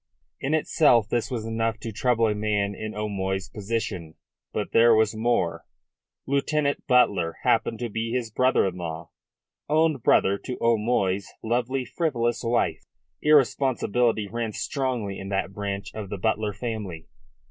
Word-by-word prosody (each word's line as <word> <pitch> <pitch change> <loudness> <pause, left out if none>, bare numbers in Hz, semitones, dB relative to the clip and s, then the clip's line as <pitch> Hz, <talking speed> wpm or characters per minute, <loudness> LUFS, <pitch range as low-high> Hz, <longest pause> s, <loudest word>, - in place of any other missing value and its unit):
In 140 +4 0
itself 145 -8 +3
this 120 -2 0
was 120 -4 -3
enough 115 0 -1
to 115 - -5
trouble 115 +1 +2
a 105 - +1
man 105 -1 0
in 110 +2 -6
O'Moy's 95 -3 -2
position. 100 -6 -4 0.4
But - - -3
there 115 0 +6
was 110 0 +2
more. 90 -8 0 0.6
Lieutenant 140 +1 0
Butler 100 -10 +3
happened - - +2
to 120 - -1
be 115 +2 -3
his 120 -2 -2
brother 130 +1 +3
in 90 -1 -2
law, 80 -1 -6 0.6
own 155 0 +3
brother 100 -4 +3
to 125 - -6
O'Moy's 105 -4 +1
lovely, 125 +3 0
frivolous 120 -6 -1
wife. 120 +1 0 0.4
Irresponsibility 125 -6 +2
ran 115 +1 -3
strongly 125 -9 -2
in 95 - -7
that 95 -1 -1
branch 100 0 -4
of 105 -3 -6
the 100 - -4
Butler 105 +1 0
family. 100 -8 -5
110 Hz, 145 wpm, -25 LUFS, 100-125 Hz, 0.6 s, there